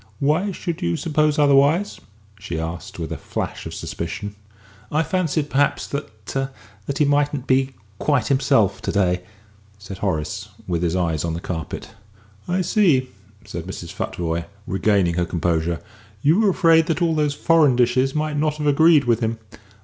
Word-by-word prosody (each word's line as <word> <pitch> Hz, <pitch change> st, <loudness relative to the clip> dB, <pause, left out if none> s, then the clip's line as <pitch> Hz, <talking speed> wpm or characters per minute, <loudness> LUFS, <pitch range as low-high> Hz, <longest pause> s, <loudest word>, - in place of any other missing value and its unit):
Why 155 Hz, +8 st, +1 dB
should 170 Hz, -2 st, -4 dB
you 85 Hz, 0 st, 0 dB
suppose 155 Hz, -1 st, +1 dB
otherwise?" 145 Hz, +7 st, +3 dB, 0.4 s
she 100 Hz, -5 st, -5 dB
asked, 80 Hz, 0 st, -6 dB
with -, -, -5 dB
a -, -, -3 dB
flash -, -, -5 dB
of -, -, -7 dB
suspicion. 100 Hz, +5 st, -5 dB, 0.6 s
"I 155 Hz, +2 st, +2 dB
fancied 160 Hz, -4 st, 0 dB
perhaps 145 Hz, +1 st, +2 dB
that 110 Hz, -7 st, -6 dB, 0.6 s
that 140 Hz, -, -2 dB
he 150 Hz, -, +3 dB
mightn't 145 Hz, -1 st, +1 dB
be 130 Hz, 0 st, +1 dB, 0.2 s
quite 140 Hz, -6 st, +1 dB
himself 130 Hz, -7 st, +2 dB
to -, -, -2 dB
day," 90 Hz, -3 st, +1 dB, 0.6 s
said 100 Hz, -2 st, -9 dB
Horace, 80 Hz, -7 st, -2 dB, 0.2 s
with 85 Hz, -2 st, -1 dB
his 85 Hz, 0 st, 0 dB
eyes 85 Hz, -5 st, 0 dB
on 85 Hz, -1 st, -2 dB
the -, -, -3 dB
carpet. 80 Hz, -3 st, -5 dB, 0.6 s
"I 180 Hz, +1 st, +1 dB
see," 170 Hz, -, +3 dB, 0.4 s
said 85 Hz, -5 st, -6 dB
Mrs. 90 Hz, -2 st, -7 dB
Futvoye, 85 Hz, -1 st, -3 dB, 0.2 s
regaining 95 Hz, -2 st, +2 dB
her 90 Hz, -, +2 dB
composure; 85 Hz, -1 st, 0 dB, 0.4 s
"you 160 Hz, +7 st, +4 dB
were 215 Hz, -2 st, +4 dB
afraid 165 Hz, -3 st, +4 dB
that 165 Hz, +1 st, 0 dB
all 165 Hz, -1 st, +2 dB
those 150 Hz, -2 st, +1 dB
foreign 155 Hz, -6 st, +4 dB
dishes 130 Hz, +3 st, +2 dB
might 150 Hz, -1 st, -1 dB
not 150 Hz, 0 st, +1 dB
have 150 Hz, -1 st, -4 dB
agreed 150 Hz, +1 st, +5 dB
with 120 Hz, -2 st, +2 dB
him. 115 Hz, -1 st, -1 dB
135 Hz, 165 wpm, -22 LUFS, 90-150 Hz, 0.6 s, agreed